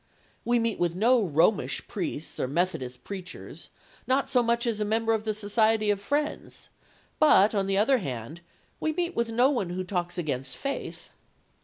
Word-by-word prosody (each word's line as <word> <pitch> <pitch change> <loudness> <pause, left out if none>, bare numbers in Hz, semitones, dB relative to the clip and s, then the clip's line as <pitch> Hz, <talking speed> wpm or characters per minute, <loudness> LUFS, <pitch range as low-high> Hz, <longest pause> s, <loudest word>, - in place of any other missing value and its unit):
We 240 +1 +2
meet 230 -2 0
with 175 -1 0
no 230 +4 +4
Romish 170 +4 +1
priests 170 -5 -5
or - - 0
Methodist 130 -6 -2
preachers, 185 -3 -8 0.4
not 265 +1 +1
so 250 - +4
much 235 0 +1
as 230 -3 -1
a - - +1
member 225 +2 +1
of 220 -1 -1
the 215 - 0
Society 215 0 +2
of 200 -1 -2
Friends, 295 +7 -3 0.5
but, 215 -9 +6
on 195 -2 0
the 195 0 +1
other 250 +6 +4
hand, 135 - -6 0.4
we 315 - -1
meet 350 +1 -2
with 235 -1 0
no 245 +4 +3
one 215 -10 -1
who 185 +1 -3
talks 180 -2 -3
against 135 -6 -3
faith. 275 0 -5
210 Hz, 175 wpm, -27 LUFS, 175-235 Hz, 0.5 s, but